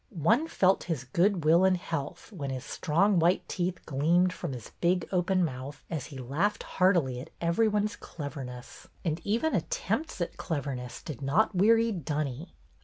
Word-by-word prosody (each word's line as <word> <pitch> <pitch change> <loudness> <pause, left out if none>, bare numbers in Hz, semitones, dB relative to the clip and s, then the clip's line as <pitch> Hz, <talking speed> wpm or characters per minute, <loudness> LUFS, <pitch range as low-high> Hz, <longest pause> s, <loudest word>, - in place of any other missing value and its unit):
One 240 - +4
felt 190 - +2
his 160 -7 -2
good 170 +6 +1
will 165 +4 +6
and 190 -1 +4
health 165 +2 -5
when 145 -9 -5
his 130 0 -4
strong 180 +5 +2
white 170 +3 +2
teeth 180 0 -2
gleamed 170 +6 +2
from 170 -2 -5
his 120 -3 -8
big 180 0 +2
open 185 0 +2
mouth 135 0 -6
as 155 -5 -3
he 140 - -9
laughed 145 +12 -1
heartily 175 -10 +2
at 130 - -9
every 170 +7 +2
one's 210 0 0
cleverness; 135 -5 -8 0.2
and 160 0 -1
even 235 +10 +1
attempts 320 -9 -1
at 175 - -3
cleverness 135 -6 -4
did 145 -6 -7
not 155 +12 +2
weary 225 +5 +4
Dunny. 155 - -3
170 Hz, 165 wpm, -29 LUFS, 140-190 Hz, 0.2 s, will